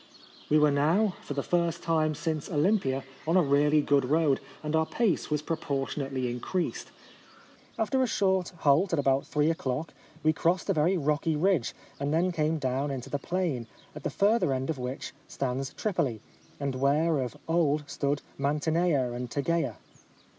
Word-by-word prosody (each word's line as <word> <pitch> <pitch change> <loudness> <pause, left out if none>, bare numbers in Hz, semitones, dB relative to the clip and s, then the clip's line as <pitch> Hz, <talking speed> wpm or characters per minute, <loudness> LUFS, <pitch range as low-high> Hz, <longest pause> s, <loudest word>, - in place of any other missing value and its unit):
We 150 - +5
were 150 -1 +5
now, 165 +9 +2
for 145 - -6
the 140 - -1
first 170 -2 0
time 155 -2 +1
since 155 -1 -3
Olympia, 150 -5 +1 0.2
on 165 +3 +4
a 180 - +5
really 145 +1 +3
good 140 -1 +3
road, 150 0 +2 0.2
and 150 +1 -1
our 160 0 +2
pace 230 -6 0
was 150 -1 -1
proportion 145 -3 -2
ately 135 -2 -2
increased. 170 +9 -3 0.9
After 245 +4 +1
a 255 - +2
short 190 -4 +1
halt 155 +6 +3
at - - +3
about 135 -1 +2
three 150 +2 +2
o'clock, 150 0 -3 0.3
we 155 0 +4
crossed 180 +5 +1
a - - +3
very 170 +4 +2
rocky 155 +1 0
ridge, 170 -5 +1 0.2
and 140 +1 -1
then 170 +4 +2
came 160 -1 0
down 135 0 -1
into 135 -1 -5
the 145 - -1
plain, 165 -9 -2 0.3
at - - -8
the - - -2
further 205 -7 +2
end 130 +3 -1
of 145 - -6
which 125 +2 -5
stands 135 0 -3
Tripoli, 165 - -1 0.4
and 140 -1 -2
where 145 +4 +2
of 125 -3 -3
old 155 -3 +2
stood 140 0 -1 0.2
Mantinea 150 -1 +1
and 125 0 -4
Tegea. 140 -3 0
150 Hz, 170 wpm, -28 LUFS, 140-170 Hz, 0.9 s, We